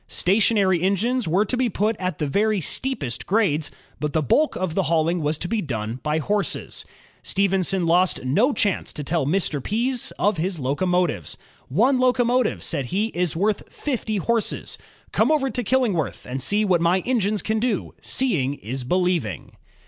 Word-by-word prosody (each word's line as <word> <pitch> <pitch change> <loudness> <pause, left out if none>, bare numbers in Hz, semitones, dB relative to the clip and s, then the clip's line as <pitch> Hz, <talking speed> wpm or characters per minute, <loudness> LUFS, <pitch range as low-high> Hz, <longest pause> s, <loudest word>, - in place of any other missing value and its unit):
Station 215 +4 +2
ary 190 -4 +3
engines 215 +6 +1
were 185 +6 +2
to 250 - 0
be 250 -1 +1
put 215 +3 0
at 180 -3 -2
the 150 - -1
very 210 +8 +1
steepest 160 - -3
grades, 175 -8 +1 0.3
but 150 -1 -2
the 160 - +1
bulk 295 - +2
of 185 -3 -2
the 195 - +1
hauling 165 +1 +1
was 150 +1 0
to 175 - -4
be 220 +3 -1
done 115 - -4
by 150 0 0
horses. 205 +6 -2 0.4
Stephenson 195 -2 +1
lost 175 -3 +2
no 210 - +3
chance 205 -5 0
to 150 - -6
tell 155 -1 0
Mr. 160 -4 +1
Pease 240 +4 0
of 205 -2 +1
his 175 +1 -2
loco 140 +8 -1
motives. 180 - 0 0.3
"One 245 - +3
locomotive," 250 -1 +2
said 140 -7 -2
he, 205 - 0
"is 175 -6 0
worth 205 +4 -1
fifty 230 -6 -2
horses. 230 +3 -1 0.3
Come - - +2
over 270 -4 +1
to 245 - -2
Killingworth 220 - 0
and 130 +2 -4
see 205 +9 +2
what 180 -4 +2
my 175 +2 +3
engines 215 -4 0
can 220 0 0
do; 230 -3 -1
seeing 160 - 0
is 130 +2 -5
believing." 175 - -1
190 Hz, 175 wpm, -23 LUFS, 155-220 Hz, 0.4 s, ary